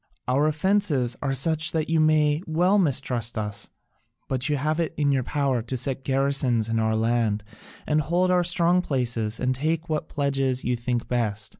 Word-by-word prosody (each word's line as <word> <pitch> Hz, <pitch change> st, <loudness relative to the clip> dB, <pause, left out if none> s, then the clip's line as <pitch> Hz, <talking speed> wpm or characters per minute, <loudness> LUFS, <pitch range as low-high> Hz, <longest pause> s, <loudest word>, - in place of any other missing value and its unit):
"Our 135 Hz, +4 st, +2 dB
offences 155 Hz, -, +1 dB
are 135 Hz, -1 st, -1 dB
such 160 Hz, +4 st, +2 dB
that 160 Hz, -1 st, -1 dB
you 165 Hz, 0 st, +1 dB
may 155 Hz, -1 st, +3 dB
well 180 Hz, +6 st, +2 dB
mistrust 125 Hz, -, +1 dB
us: 105 Hz, -1 st, -3 dB, 0.6 s
but 130 Hz, +2 st, -1 dB
you 145 Hz, -, +1 dB
have 155 Hz, +4 st, -1 dB
it 165 Hz, -2 st, -2 dB
in 145 Hz, -2 st, +2 dB
your 135 Hz, -2 st, +1 dB
power 135 Hz, -1 st, -1 dB
to 120 Hz, +3 st, -4 dB
set 130 Hz, +1 st, -2 dB
garrisons 135 Hz, -4 st, +1 dB
in 115 Hz, 0 st, 0 dB
our 110 Hz, 0 st, +1 dB
land 110 Hz, -2 st, 0 dB, 0.4 s
and 155 Hz, 0 st, +1 dB
hold 175 Hz, +4 st, +1 dB
our 180 Hz, -1 st, +3 dB
strong 175 Hz, +1 st, +2 dB
places 120 Hz, -7 st, -2 dB
and 130 Hz, +1 st, 0 dB
take 160 Hz, +5 st, -2 dB
what 155 Hz, -1 st, -2 dB
pledges 135 Hz, -2 st, -1 dB
you 125 Hz, -, 0 dB
think 120 Hz, 0 st, -3 dB
best. 110 Hz, -5 st, -1 dB
135 Hz, 180 wpm, -24 LUFS, 120-155 Hz, 0.6 s, may